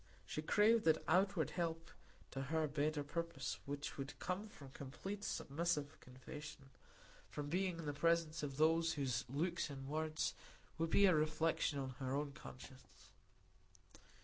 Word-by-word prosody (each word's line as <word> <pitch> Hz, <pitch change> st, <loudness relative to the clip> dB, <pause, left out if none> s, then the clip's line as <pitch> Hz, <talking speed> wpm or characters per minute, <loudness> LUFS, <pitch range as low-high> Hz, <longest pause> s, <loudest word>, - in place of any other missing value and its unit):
She 155 Hz, -, -3 dB
craved 215 Hz, +7 st, +5 dB
that 160 Hz, -, +4 dB
outward 185 Hz, -3 st, +3 dB
help 165 Hz, -2 st, -2 dB, 0.4 s
to 135 Hz, -, -3 dB
her 155 Hz, +2 st, +1 dB
better 150 Hz, +1 st, 0 dB
purpose 155 Hz, -3 st, -3 dB
which 145 Hz, 0 st, -4 dB
would 135 Hz, +1 st, -4 dB
come 190 Hz, +4 st, -2 dB
from 140 Hz, -8 st, -12 dB
complete, 190 Hz, +11 st, -6 dB
submissive 150 Hz, -2 st, -1 dB
confession; 135 Hz, +2 st, -9 dB, 0.6 s
from 145 Hz, -1 st, -4 dB
being 180 Hz, +1 st, +1 dB
in 165 Hz, -, -5 dB
the 145 Hz, -, -1 dB
presence 165 Hz, +1 st, +2 dB
of 140 Hz, -2 st, -3 dB
those 165 Hz, +1 st, +4 dB
whose 135 Hz, -4 st, 0 dB
looks 165 Hz, +5 st, 0 dB
and 135 Hz, -1 st, -6 dB
words 155 Hz, +1 st, 0 dB, 0.5 s
would 165 Hz, 0 st, +1 dB
be 200 Hz, -, +6 dB
a 185 Hz, -, +7 dB
reflection 155 Hz, -1 st, +2 dB
of 130 Hz, -2 st, -3 dB
her 130 Hz, -1 st, -1 dB
own 145 Hz, 0 st, -1 dB
conscience. 130 Hz, -1 st, -12 dB
155 Hz, 150 wpm, -40 LUFS, 140-165 Hz, 0.6 s, a